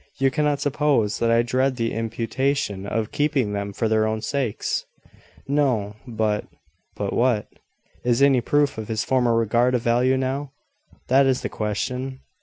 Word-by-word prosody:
You 135 0 +2
cannot 150 0 +1
suppose 145 -7 +1
that 115 - +1
I 115 0 +4
dread 130 +2 +1
the 115 -2 -1
imputation 115 -2 -2
of 110 +1 -2
keeping 145 -8 0
them 100 0 -3
for 110 +3 -1
their 110 0 +2
own 110 0 -2
sakes!" 130 -3 -1 0.6
"No: 130 -8 +1
but 110 -3 -1 0.2
" - - -44
"But - - -2
what?" 120 -4 +1 0.6
"Is 120 -1 +2
any 135 -3 +5
proof 145 0 +1
of 110 - -6
his 110 0 -1
former 125 -3 +2
regard 120 +3 +2
of 120 - -1
value 125 +3 +3
now? 135 +2 -2 0.6
That 135 +2 +5
is 130 -1 +1
the - - -3
question. 125 +5 -3
120 Hz, 165 wpm, -23 LUFS, 110-135 Hz, 0.6 s, any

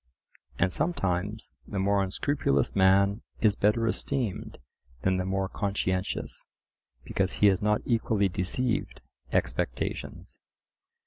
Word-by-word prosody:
And 90 +1 +1
sometimes 100 - -1 0.2
the 100 - -5
more 100 +1 +2
unscrupulous 95 - 0
man 100 +2 +4 0.2
is 105 -3 +3
better 105 +3 +2
esteemed 120 -1 -2 0.5
than 95 0 +2
the 90 - -1
more 95 0 0
conscientious, 95 -2 -2 0.6
because 95 -1 -1
he - - +2
has 95 -2 +1
not 105 0 +2
equally 110 -4 +2
deceived 90 - -2 0.3
expectations. - - -2
100 Hz, 110 wpm, -28 LUFS, 95-105 Hz, 0.6 s, man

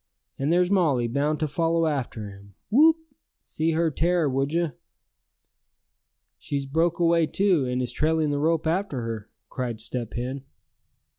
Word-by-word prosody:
And 140 +3 0
there's 180 +2 +3
Molly 150 -11 +2
bound 145 +5 0
to 155 - +1
follow 165 +2 +1
after 130 -8 -2
him, 100 0 -14 0.2
whoop! 315 +7 +6 0.5
see 160 +1 -1
her 165 0 +1
tear, 170 +2 +1
would 135 +1 0
you?" 170 -1 0 1.7
"She's 140 -1 -3
broke 165 +5 +1
away 170 -1 +3
too, 180 -7 +2
and 125 0 -1
is 125 - -3
trailing 155 -1 +1
the 145 - -1
rope 160 +1 +1
after 160 -5 -1
her!" 115 -2 -5 0.2
cried 120 -4 -4
Step 115 0 -4
Hen. 130 +3 -4
150 Hz, 150 wpm, -25 LUFS, 130-165 Hz, 1.7 s, whoop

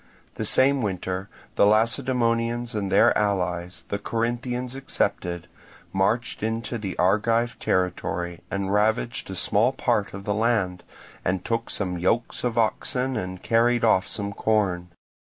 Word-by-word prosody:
The - - -3
same 135 +1 +4
winter 95 -1 -3 0.3
the 100 - +6
Lacedaemonians 115 +1 +1
and 100 -3 -2
their - - +5
allies, 90 -4 -1
the 100 - -2
Corinthians 120 +3 -2
excepted, 90 -10 -2 0.5
marched 100 +5 0
into 115 +2 -2
the 100 -3 -5
Argive 115 +5 +2
territory, 90 -1 -1
and 100 0 -2
ravaged 110 +2 +1
a 95 - -5
small - - +3
part 105 -2 0
of 95 - -7
the 105 - -1
land, 105 -5 +1 0.4
and 90 0 -1
took 115 0 -1
some 90 -3 -2
yokes 115 +7 0
of 120 -2 -1
oxen 125 +3 0
and 95 -4 -4
carried 120 +1 +3
off 110 -4 +4
some 100 -1 -3
corn. 100 -5 0
110 Hz, 135 wpm, -25 LUFS, 95-120 Hz, 0.5 s, the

